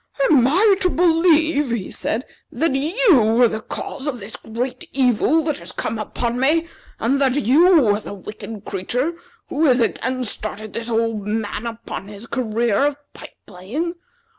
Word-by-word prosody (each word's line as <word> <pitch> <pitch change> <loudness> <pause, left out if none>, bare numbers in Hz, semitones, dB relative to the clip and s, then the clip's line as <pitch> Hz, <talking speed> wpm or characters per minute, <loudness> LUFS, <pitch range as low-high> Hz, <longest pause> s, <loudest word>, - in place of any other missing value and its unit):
"Am 255 -6 +5
I 390 +7 +4
to 365 - +3
believe," 325 -4 +3
he 230 -5 -3
said, 235 +4 -2 0.3
"that 275 +2 0
you 285 - +3
are 245 - +7
the 220 -1 -4
cause 265 +5 -6
of 275 -4 -2
this 215 0 -8
great 245 +3 -5
evil 270 +5 +2
that 300 -2 -2
has - - -8
come 220 0 -3
upon 235 +3 -3
me? 320 +5 +2 0.3
and 270 +5 +1
that 270 0 +1
you 320 - +5
are 205 0 +2
the 205 - -8
wicked 210 +1 -9
creature 245 - -2 0.4
who 310 +3 +1
has 255 -2 +4
again 255 +2 -1
started 215 -1 -5
this 230 0 -4
old 225 -3 -1
man 215 +1 -3
upon 230 -4 -7
his 205 +2 -10
career 235 -3 0
of 290 -1 -3 0.2
pipe - - -12
playing? 235 - -4
245 Hz, 165 wpm, -21 LUFS, 220-300 Hz, 0.4 s, are